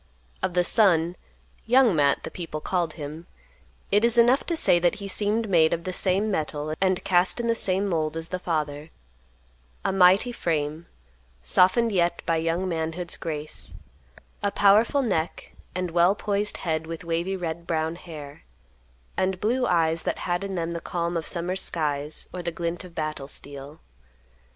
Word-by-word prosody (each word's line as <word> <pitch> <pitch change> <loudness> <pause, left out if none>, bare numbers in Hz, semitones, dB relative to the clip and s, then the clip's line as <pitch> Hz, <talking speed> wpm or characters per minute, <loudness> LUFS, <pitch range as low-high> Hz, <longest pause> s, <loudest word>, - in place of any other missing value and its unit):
Of 180 - -2
the 180 - +4
son, 175 -4 +3 0.5
"Young 245 -4 +5
Matt," 140 -2 +2
the - - -6
people 165 -3 -5
called 170 -1 -1
him, 155 +2 -8 0.6
it 205 +2 +4
is 235 0 +5
enough 240 +3 +5
to 335 - 0
say 175 - +4
that 175 0 +2
he 200 -1 -6
seemed 210 +3 0
made 165 -4 +4
of 170 0 -2
the 185 - -4
same 195 +4 +1
metal 155 -3 -2
and 185 -1 +2
cast 180 +4 +3
in 235 - -1
the 230 - +3
same 195 -2 0
mold 160 -3 -1
as 165 0 -4
the 185 - -3
father; 155 -3 -3 1.0
a - - +1
mighty 190 +5 +5
frame, 160 -6 -2 0.6
softened 185 - +4
yet 175 -3 +1
by 165 - +1
young 165 +3 -1
manhood's 165 +1 -2
grace; 155 -1 -5 0.7
a 205 - +1
powerful 215 +8 +4
neck 175 -8 -2 0.2
and 180 -2 -2
well 175 +3 +4
poised 205 0 -1
head 160 -2 -2
with 165 +1 -6
wavy 170 +3 -1
red 170 -1 -5
brown 160 0 -1
hair; 155 -5 -10 0.7
and 185 0 0
blue 245 +5 +1
eyes 165 -1 +2
that - - -2
had 175 +1 -1
in 195 -1 -4
them 170 -1 -2
the 170 0 -4
calm 170 0 -2
of 165 -2 -2
summer 175 +1 -2
skies 150 -5 -1
or 180 - -4
the 170 0 -3
glint 170 +1 -3
of 180 -2 -13
battle 155 -4 -3
steel. 145 +2 -7
175 Hz, 170 wpm, -25 LUFS, 160-195 Hz, 1.0 s, Young